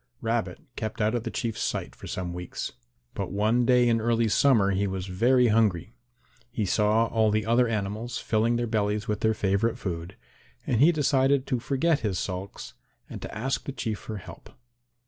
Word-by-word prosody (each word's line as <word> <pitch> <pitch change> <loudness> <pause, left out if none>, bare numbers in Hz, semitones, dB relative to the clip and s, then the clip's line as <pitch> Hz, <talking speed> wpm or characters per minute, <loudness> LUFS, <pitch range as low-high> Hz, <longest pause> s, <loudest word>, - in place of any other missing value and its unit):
Rabbit 115 +5 -2 0.2
kept 110 -1 -4
out 110 +1 +1
of 120 -1 -2
the - - -1
Chief's 115 -1 -3
sight - - -3
for - - -10
some 90 -1 -4
weeks. 90 0 -5 0.4
But - - -4
one 110 +4 +2
day 125 -1 +5
in 115 -1 +2
early 115 0 +2
summer 110 -5 +4
he 100 +1 0
was 95 -1 -3
very 120 +6 +3
hungry. 105 -3 +1 0.6
He 115 -3 -2
saw 105 +3 +3
all 110 -1 +2
the 105 0 0
other 120 +2 +3
animals 110 +2 -3
filling 115 +2 +1
their 120 0 0
bellies 105 -2 -1
with 105 -1 -1
their 110 0 +1
favourite 100 +4 0
food, 85 0 -5 0.5
and 120 -1 +1
he 160 +4 +7
decided 140 -3 +2
to 125 -3 -1
forget 145 +5 +1
his 105 -8 -2
sulks 95 +2 -5 0.4
and - - -7
to - - -6
ask 135 +5 -2
the - - -3
Chief 110 -6 -3
for 110 - -6
help. 100 - -11
110 Hz, 185 wpm, -27 LUFS, 100-120 Hz, 0.6 s, he